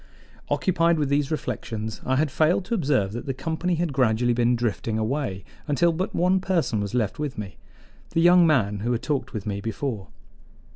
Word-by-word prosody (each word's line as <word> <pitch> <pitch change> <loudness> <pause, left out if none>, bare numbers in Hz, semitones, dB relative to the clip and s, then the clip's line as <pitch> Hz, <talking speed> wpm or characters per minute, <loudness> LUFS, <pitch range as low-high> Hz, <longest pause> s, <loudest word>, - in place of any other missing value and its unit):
Occupied 170 -2 +2
with 145 -3 0
these 140 0 +1
reflections, 110 -8 -4
I 130 - 0
had 145 +1 +1
failed 160 +5 +2
to 235 - -3
observe 135 - +1
that 120 +5 -6
the 135 - -2
company 165 +6 -1
had 165 -3 -1
gradually 120 -2 +2
been 120 +1 +2
drifting 115 -1 -2
away 110 - -2 0.2
until 155 +4 +3
but 185 +4 -3
one 180 +2 +3
person 175 - 0
was 100 +2 -3
left 110 -1 -1
with 150 -3 -3
me 100 -2 -6 0.5
the - - -1
young 175 0 +6
man 105 -10 +2
who 120 +4 -1
had 120 - -2
talked 145 -3 -2
with 110 -4 -5
me 100 -1 -3
before. 115 -1 -4
135 Hz, 190 wpm, -25 LUFS, 110-160 Hz, 0.5 s, young